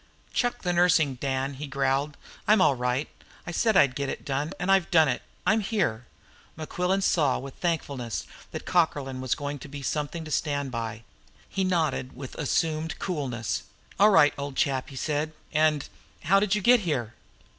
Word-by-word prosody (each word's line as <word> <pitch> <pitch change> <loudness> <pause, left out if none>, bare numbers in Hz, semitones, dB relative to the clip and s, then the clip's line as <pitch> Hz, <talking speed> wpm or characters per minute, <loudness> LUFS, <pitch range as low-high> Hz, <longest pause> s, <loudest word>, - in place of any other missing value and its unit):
"Chuck 245 0 0
the 180 -1 +1
nursing, 170 -5 +4
Dan," 135 +1 -2
he 145 +3 -6
growled. 135 +1 0 0.3
"I'm 215 0 +6
all 165 -6 +5
right. 125 +3 -1 0.4
I - - -5
said 220 +3 +2
I'd 140 -8 +5
get 140 +1 -2
it - - -6
done, 145 +2 -1
and 180 +2 +1
I've 190 -3 +3
done 160 -4 +5
it. 125 - -1 0.2
I'm 220 +1 +4
here!" 175 - -1 0.5
Mequillen 180 +5 -1
saw 150 -8 +3
with 135 0 -7
thankfulness 140 -9 -2 0.2
that - - -7
Cockerlyne 145 -7 +1
was 130 - 0
going 145 0 -4
to - - -9
be 140 0 -8
something 150 +4 -2
to 155 - -8
stand 140 -3 -1
by. 115 -1 -4 0.4
He 195 - -1
nodded 160 -8 0
with 130 -2 -8
assumed 160 +2 0
coolness. 135 - -2 0.4
"All 210 +2 +7
right, 150 -8 +6
old 140 -1 -4
chap," 135 -2 0
he 135 - -11
said. 150 +4 -1 0.2
"And 155 -2 +2 0.4
how 195 +6 +5
did 210 0 +2
you 210 - -1
get 245 +3 +6
here?" 135 - -2
145 Hz, 175 wpm, -27 LUFS, 135-175 Hz, 0.5 s, All